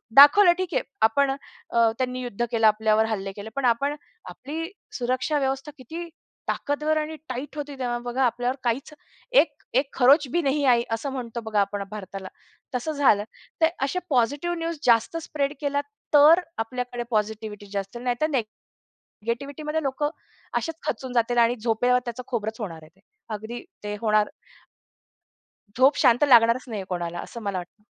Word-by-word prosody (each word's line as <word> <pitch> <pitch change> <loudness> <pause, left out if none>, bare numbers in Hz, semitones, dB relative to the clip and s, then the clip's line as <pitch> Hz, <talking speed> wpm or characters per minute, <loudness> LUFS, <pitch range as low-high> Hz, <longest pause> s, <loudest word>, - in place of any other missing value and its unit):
दाखवलं 345 +6 +9
ठीक 370 -2 -3
आहे - - +2 0.2
आपण 270 +5 +4
अ, 235 -4 0
त्यांनी 255 -1 -2
युद्ध 240 -1 -2
केलं 225 -1 +4
आपल्यावर 215 +1 +3
हल्ले 195 -2 -2
केले. 210 +2 -7
पण 275 -2 -1
आपण 275 +5 +2 0.3
आपली 325 +6 -6 0.3
सुरक्षा 255 +5 0
व्यवस्था 270 +2 -2
किती 330 +7 -7 0.4
ताकदवर 300 +2 0
आणि 310 +1 -2
टाईट 260 +4 -5
होती 290 -1 -5
तेव्हा 240 -1 -1
बघा 245 +2 -1
आपल्यावर 245 +2 0
काहीच 255 +6 -1 0.5
एक 290 -3 -6
एक 270 +2 +3
खरोच 275 +3 +5
भी 345 - +2
नाही 285 0 +1
आई, 240 -2 +5
असं 245 +5 -2
म्हणतो 235 -3 -5
बघा 215 -2 0
आपण 200 0 -2
भारताला. 195 -2 -7 0.5
तसं 250 +6 -1
झालं. 265 -9 +3 0.4
तर 320 - +7 0.2
अशा 365 +7 0
पॉझिटिव्ह 285 +7 +1
न्यूज 330 -1 -3
जास्त 235 +7 +3
स्प्रेड 285 -1 -1
केला 285 0 0 0.3
तर 300 +4 +8 0.2
आपल्याकडे 245 +1 -3
पॉझिटिव्हिटी 215 -1 -2
जास्त 200 +3 -4
नाहीतर 250 +5 0 0.7
निगेटिव्हिटीमध्ये 285 +7 -4
लोकं 285 +2 -1 0.5
असेच 325 -1 -4
खचून 250 +2 -3
जातील 240 0 +1
आणि 235 +1 +4
झोपल्यावर 245 +3 +2
त्याचं 240 +1 -5
खोबरच 220 -2 -3
होणार 165 -6 -5
आहे. 165 +5 -21 0.3
अगदी 220 +3 -6 0.2
ते 210 0 -3
होणार. 215 -1 +3 1.5
झोप 265 +3 +5
शांत 245 +4 +4
लागणारच 235 0 +6
नाहीये 210 -5 -5
कोणाला 175 -1 -3
असं 235 - -7
मला 200 -3 -2
वाटतं. 190 +4 -9
245 Hz, 155 wpm, -25 LUFS, 220-285 Hz, 1.5 s, दाखवलं